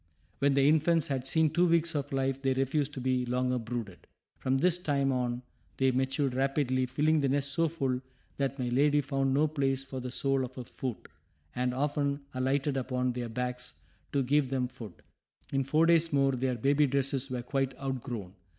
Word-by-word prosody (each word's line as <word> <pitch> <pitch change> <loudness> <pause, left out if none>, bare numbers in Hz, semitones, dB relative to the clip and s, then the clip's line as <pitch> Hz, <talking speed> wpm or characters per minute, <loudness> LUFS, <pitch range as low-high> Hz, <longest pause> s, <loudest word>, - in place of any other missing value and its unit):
When 140 0 +3
the 140 0 +4
infants 160 +1 +3
had 135 -2 -2
seen 160 +1 +3
two 175 +3 +3
weeks 170 0 +2
of 145 -2 -3
life 135 0 -1
they 135 -1 +1
refused 135 +2 0
to 135 - -5
be 130 0 +1
longer 125 +1 0
brooded. 115 -5 -6 0.3
From 130 0 +1
this 175 +4 +2
time 140 -5 +1
on 125 -1 -1 0.3
they 135 0 +3
matured 130 +1 0
rapidly, 130 -1 +1
filling 150 +5 +2
the 140 -2 +1
nest 140 +1 +1
so 165 +2 +2
full 135 -5 -1 0.4
that 140 0 -1
my 125 -2 -2
lady 145 +4 +3
found 135 -1 0
no 145 +3 +3
place 135 -3 0
for 135 -1 -6
the 125 0 -5
sole 135 +1 0
of 130 0 -7
her 125 - -6
foot, 120 -1 -6 0.5
and 125 0 0
often 140 +1 -1
alighted 135 +2 0
upon 125 -1 -1
their 120 -1 -4
backs 125 +2 -4 0.4
to 140 -1 +1
give 140 +1 +2
them 130 -1 0
food. 110 -7 -11 0.5
In 135 0 +1
four 155 +5 +3
days 165 0 +4
more 135 -1 +3
their 130 0 -1
baby 140 +5 +3
dresses 135 0 0
were 125 -1 -3
quite 135 +1 -1
outgrown. 125 -8 -4
135 Hz, 190 wpm, -30 LUFS, 125-145 Hz, 0.5 s, the